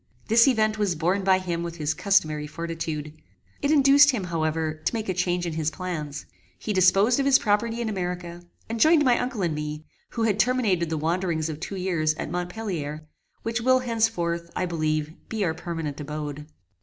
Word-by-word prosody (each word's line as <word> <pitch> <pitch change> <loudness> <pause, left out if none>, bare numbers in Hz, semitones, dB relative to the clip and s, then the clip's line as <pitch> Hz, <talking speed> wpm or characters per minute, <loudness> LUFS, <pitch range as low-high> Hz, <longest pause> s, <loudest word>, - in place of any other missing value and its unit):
This 230 +3 +6
event 215 -4 +2
was 200 -4 +1
borne 180 +5 0
by 190 0 +4
him 175 -2 -3
with 170 -1 -5
his 155 -2 -1
customary 155 -7 +1
fortitude. 160 -2 -5 0.5
It 285 - 0
induced 285 -1 +6
him, 240 -8 0
however, 160 -2 -2
to - - 0
make 220 -1 -3
a 185 - 0
change 180 -1 0
in 170 - -3
his 155 -1 0
plans. 155 -4 -5 0.3
He 210 - -3
disposed 195 +6 +4
of 275 - +1
his 270 -1 +7
property 225 +2 0
in 235 - -2
America, 180 -3 -4 0.3
and 230 0 -4
joined 315 +2 +5
my 245 -2 +4
uncle 245 -5 -2
and 170 -3 0
me, 150 0 -5 0.2
who 230 - -2
had 215 -2 +1
terminated 210 -10 +2
the 160 - -1
wanderings 165 0 -1
of 155 -1 -5
two 185 +4 -5
years 170 -5 0
at - - -5
Montpellier, 175 -5 -4 0.4
which 230 +1 -2
will 255 +2 +4
henceforth, 200 -8 -1
I 185 - 0
believe, 155 -2 -1 0.2
be 215 -3 -1
our 160 - 0
permanent 165 -3 -5
abode. 150 0 -6
180 Hz, 190 wpm, -25 LUFS, 155-220 Hz, 0.5 s, his